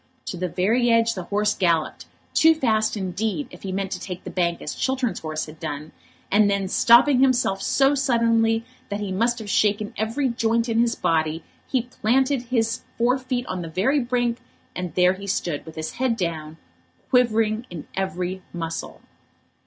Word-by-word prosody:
To -, -, -4 dB
the 180 Hz, +1 st, -2 dB
very 225 Hz, +8 st, +2 dB
edge 230 Hz, 0 st, +3 dB
the 185 Hz, -4 st, -6 dB
horse 210 Hz, +2 st, +1 dB
galloped, 170 Hz, -4 st, 0 dB, 0.3 s
too 320 Hz, 0 st, +6 dB
fast, 220 Hz, -7 st, +1 dB
indeed, 210 Hz, +7 st, -2 dB
if -, -, -13 dB
he 190 Hz, -, -5 dB
meant 195 Hz, 0 st, -2 dB
to -, -, -3 dB
take 180 Hz, -2 st, -7 dB
the -, -, -7 dB
bank 170 Hz, -2 st, 0 dB
as 150 Hz, -, -5 dB
Chiltern's 260 Hz, -3 st, -1 dB
horse 155 Hz, -1 st, -4 dB
had 155 Hz, 0 st, -12 dB
done, 150 Hz, +1 st, -5 dB, 0.4 s
and 205 Hz, +1 st, +5 dB
then 200 Hz, -1 st, 0 dB
stopping 240 Hz, +7 st, +5 dB
himself 250 Hz, -7 st, +2 dB
so 275 Hz, +1 st, +3 dB
suddenly 230 Hz, -4 st, +2 dB, 0.2 s
that 205 Hz, 0 st, -3 dB
he 205 Hz, -2 st, -4 dB
must 230 Hz, +5 st, +1 dB
have 220 Hz, -3 st, -7 dB
shaken 205 Hz, +1 st, +1 dB
every 225 Hz, +6 st, 0 dB
joint 230 Hz, 0 st, +1 dB
in 230 Hz, -1 st, +1 dB
his 235 Hz, 0 st, +2 dB
body, 160 Hz, 0 st, 0 dB, 0.2 s
he 255 Hz, -3 st, 0 dB
planted 260 Hz, +2 st, +1 dB
his 225 Hz, -3 st, 0 dB, 0.2 s
fore 250 Hz, +3 st, +2 dB
feet 255 Hz, -1 st, -3 dB
on 185 Hz, -5 st, -4 dB
the 165 Hz, -, -6 dB
very 210 Hz, -, +1 dB
brink, 245 Hz, -1 st, 0 dB, 0.4 s
and 180 Hz, -3 st, -5 dB
there 180 Hz, 0 st, +4 dB
he 200 Hz, +1 st, -9 dB
stood, 170 Hz, -5 st, -2 dB
with 160 Hz, -, -10 dB
his 160 Hz, 0 st, -4 dB
head 255 Hz, -3 st, -1 dB
down, 160 Hz, -4 st, -3 dB, 0.5 s
quivering 225 Hz, -2 st, +2 dB
in 170 Hz, -4 st, -8 dB
every 190 Hz, -1 st, -2 dB
muscle. 165 Hz, -1 st, -5 dB
215 Hz, 180 wpm, -23 LUFS, 180-240 Hz, 0.5 s, too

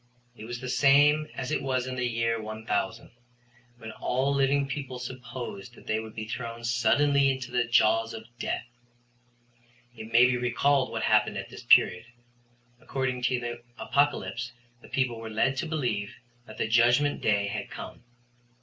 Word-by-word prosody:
It 110 Hz, -1 st, -10 dB
was 120 Hz, +1 st, -5 dB
the 125 Hz, -, -6 dB
same 145 Hz, +3 st, +4 dB
as 130 Hz, +2 st, -4 dB
it -, -, 0 dB
was 130 Hz, -2 st, -1 dB
in 130 Hz, -, -4 dB
the 125 Hz, -1 st, 0 dB
year 115 Hz, -1 st, 0 dB
1000, 110 Hz, -2 st, -3 dB, 0.7 s
when 110 Hz, -2 st, -8 dB
all 130 Hz, +5 st, -1 dB
living 140 Hz, 0 st, +2 dB
people 135 Hz, -2 st, -5 dB
supposed 125 Hz, -2 st, -7 dB
that -, -, -16 dB
they 110 Hz, 0 st, 0 dB
would 110 Hz, 0 st, -9 dB
be 110 Hz, -1 st, -5 dB
thrown 115 Hz, +1 st, -6 dB
suddenly 135 Hz, +4 st, +3 dB
into 130 Hz, -2 st, -3 dB
the 125 Hz, -1 st, +1 dB
jaws 115 Hz, -1 st, +3 dB
of 110 Hz, -1 st, -7 dB, 0.2 s
death. -, -, -2 dB, 1.3 s
It 110 Hz, 0 st, -9 dB
maybe 125 Hz, +2 st, +5 dB
recalled 130 Hz, +2 st, +2 dB
what -, -, -3 dB
happened -, -, +3 dB
at -, -, -6 dB
this -, -, -10 dB
period. -, -, +4 dB, 0.7 s
According 130 Hz, -2 st, -2 dB
to 125 Hz, -, +1 dB
the 120 Hz, 0 st, -5 dB, 0.2 s
Apocalypse 120 Hz, -5 st, 0 dB, 0.3 s
the -, -, -15 dB
people 125 Hz, -3 st, -1 dB
were 115 Hz, 0 st, -7 dB
led 120 Hz, +5 st, +1 dB
to 165 Hz, -, -2 dB
believe 120 Hz, -10 st, -2 dB, 0.3 s
that 110 Hz, -, -11 dB
the -, -, 0 dB
judgment 120 Hz, +5 st, +3 dB
day 100 Hz, -2 st, +2 dB
had 100 Hz, -, -4 dB
come. -, -, -9 dB
125 Hz, 165 wpm, -28 LUFS, 115-135 Hz, 1.3 s, maybe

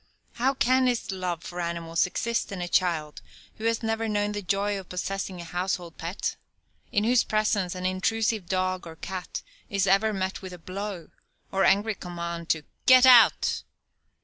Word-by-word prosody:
How 260 Hz, +3 st, +1 dB
can 260 Hz, 0 st, +3 dB
this 245 Hz, -5 st, 0 dB
love 180 Hz, -3 st, -3 dB
for 175 Hz, 0 st, -5 dB
animals 170 Hz, 0 st, 0 dB
exist 235 Hz, +4 st, -2 dB
in 195 Hz, -, -5 dB
a 175 Hz, -, -3 dB
child 165 Hz, -4 st, 0 dB, 0.4 s
who 220 Hz, -, -6 dB
has 230 Hz, 0 st, +1 dB
never 225 Hz, 0 st, -1 dB
known 205 Hz, 0 st, 0 dB
the 205 Hz, 0 st, -3 dB
joy 200 Hz, +1 st, 0 dB
of 190 Hz, -, -12 dB
possessing 190 Hz, 0 st, -3 dB
a -, -, -6 dB
household 175 Hz, 0 st, -3 dB
pet? 170 Hz, +4 st, -3 dB, 0.5 s
In 205 Hz, -, +2 dB
whose 240 Hz, +2 st, +4 dB
presence 210 Hz, -4 st, 0 dB
an 180 Hz, 0 st, -5 dB
intrusive 210 Hz, +2 st, 0 dB
dog 185 Hz, -1 st, -1 dB
or 165 Hz, -, -9 dB
cat 185 Hz, +2 st, -6 dB, 0.3 s
is 200 Hz, -3 st, +1 dB
ever 200 Hz, +3 st, +3 dB
met 190 Hz, -1 st, -3 dB
with 185 Hz, -2 st, -8 dB
a -, -, -8 dB
blow, 185 Hz, 0 st, -6 dB, 0.4 s
or 195 Hz, 0 st, +2 dB
angry 205 Hz, +3 st, +3 dB
command 170 Hz, -2 st, -6 dB
to 160 Hz, -2 st, +1 dB, 0.2 s
"get 255 Hz, 0 st, +8 dB
out?" 245 Hz, -3 st, +6 dB
190 Hz, 175 wpm, -27 LUFS, 175-215 Hz, 0.5 s, get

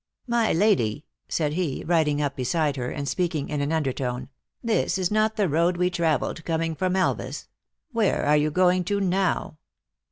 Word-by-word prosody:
" -, -, -63 dB
My 235 Hz, -2 st, +2 dB
Lady," 165 Hz, -, +2 dB, 0.2 s
said 150 Hz, -2 st, 0 dB
he, 165 Hz, -5 st, -2 dB
riding 155 Hz, -3 st, +2 dB
up 140 Hz, -1 st, -2 dB
beside 145 Hz, +3 st, 0 dB
her, 125 Hz, -2 st, -3 dB
and 140 Hz, -2 st, -4 dB
speaking 160 Hz, 0 st, -1 dB
in 150 Hz, -1 st, -2 dB
an 140 Hz, +2 st, -1 dB
under 150 Hz, -5 st, 0 dB
tone, 125 Hz, 0 st, -4 dB, 0.2 s
" -, -, -50 dB
this -, -, +1 dB
is 185 Hz, 0 st, -1 dB
not 215 Hz, +1 st, +2 dB
the 205 Hz, -3 st, +1 dB
road 170 Hz, +3 st, +1 dB
we 180 Hz, +1 st, +1 dB
traveled 165 Hz, -1 st, 0 dB
coming 165 Hz, 0 st, -1 dB
from 185 Hz, +3 st, -1 dB
Elvas. 190 Hz, -, -1 dB, 0.5 s
Where 225 Hz, -, +1 dB
are 150 Hz, +1 st, +4 dB
you 150 Hz, +1 st, +2 dB
going 180 Hz, +3 st, +3 dB
to 200 Hz, +3 st, 0 dB
now 190 Hz, -4 st, 0 dB
165 Hz, 190 wpm, -25 LUFS, 145-185 Hz, 0.5 s, are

